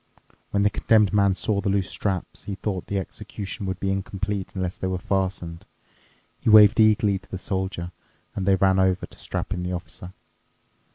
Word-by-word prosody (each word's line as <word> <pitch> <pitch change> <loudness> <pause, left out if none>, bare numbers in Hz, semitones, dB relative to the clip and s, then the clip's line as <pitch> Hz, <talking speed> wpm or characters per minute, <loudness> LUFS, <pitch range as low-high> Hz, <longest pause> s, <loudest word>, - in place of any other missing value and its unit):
When 100 0 +1
the 105 - +3
Condemned 105 -2 +3
Man 100 -2 +3
saw 100 0 -1
the 100 - -1
loose 95 -1 0
straps, 95 -4 -3
he 100 - -4
thought 95 -2 -4
the 100 - -2
execution 95 +1 -6
would 95 0 -3
be 95 - 0
incomplete 95 0 -3
unless 90 -2 -2
they 95 - -3
were 95 0 -1
fastened. 90 -3 -2 0.8
He - - 0
waved 105 +1 +8
eagerly 105 -2 +4
to 105 - -23
the 95 - -4
Soldier, 95 -2 -3 0.4
and 95 -1 -3
they 95 - +5
ran 95 0 +3
over 95 -1 +2
to - - -18
strap - - -3
in 90 - -4
the 90 +1 -3
Officer. 90 +1 -7
95 Hz, 185 wpm, -24 LUFS, 95-100 Hz, 0.8 s, waved